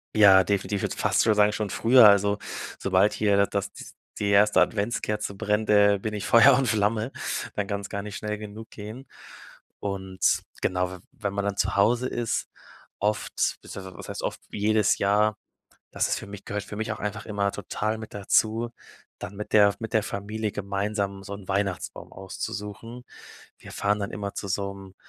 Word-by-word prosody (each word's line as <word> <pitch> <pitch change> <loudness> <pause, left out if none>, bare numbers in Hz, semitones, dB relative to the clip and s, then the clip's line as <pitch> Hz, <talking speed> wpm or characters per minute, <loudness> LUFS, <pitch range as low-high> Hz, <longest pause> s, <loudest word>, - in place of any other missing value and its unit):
Ja, 95 -3 +8
definitiv, 100 0 -1
würde - - -3
fast - - +2
schon 110 -2 +3
sagen 105 0 +4
schon 105 -2 -2
früher, 120 +3 +6
also 100 0 +3 0.4
sobald 100 +2 +3
hier 100 -2 +2
das - - -16
das 100 0 -2 0.5
die 100 -1 0
1. 100 +1 +5
Adventskerze 105 -1 0
brennt, 105 +1 -1
äh, 100 -1 +5
bin 105 +1 -4
ich 105 - -4
Feuer 130 +4 +7
und 135 -2 +1
Flamme, 110 +3 +1 0.4
dann 105 - -1
kann's 100 0 -4
gar 100 - -4
nicht 105 0 -7
schnell 105 0 -3
genug 105 +1 -9
gehen. 110 +6 -9 0.7
Und 95 -2 0 0.2
genau, 90 0 0
we 90 - -8
wenn 100 -7 -4
man 100 0 -2
dann 100 -1 -1
zu - - 0
Hause 120 +5 +3
ist, 120 -1 -2 0.5
oft 105 +1 0
beziehungsweise 95 -2 -9
was - - -9
heißt, - - -5
oft, - - -3
jedes 105 0 +2
Jahr, 105 +1 +2 0.6
das - - 0
ist - - 0
für - - -9
mich 100 0 -10
gehört 105 0 -4
für 105 - -8
mich 110 +1 -2
auch - - -7
einfach 105 +1 -4
immer 100 -1 0
total 105 +2 -3
mit 110 - -9
dazu, 110 +3 +1 0.5
dann 100 - -7
mit 105 - -7
der 105 -1 +7
F 100 - -4
mit 115 0 -6
der 110 - +4
Familie 105 +1 -4
gemeinsam 100 0 -2
so 100 - -8
'n 100 -1 -11
Weihnachtsbaum 95 -1 -2
auszusuchen. 105 +5 -7 0.5
Wir - - -12
fahren 105 +1 0
dann 100 - -3
immer 100 -1 -5
zu 100 - -5
so 100 0 -2
'nem 95 -1 -12
105 Hz, 185 wpm, -26 LUFS, 100-110 Hz, 0.7 s, Ja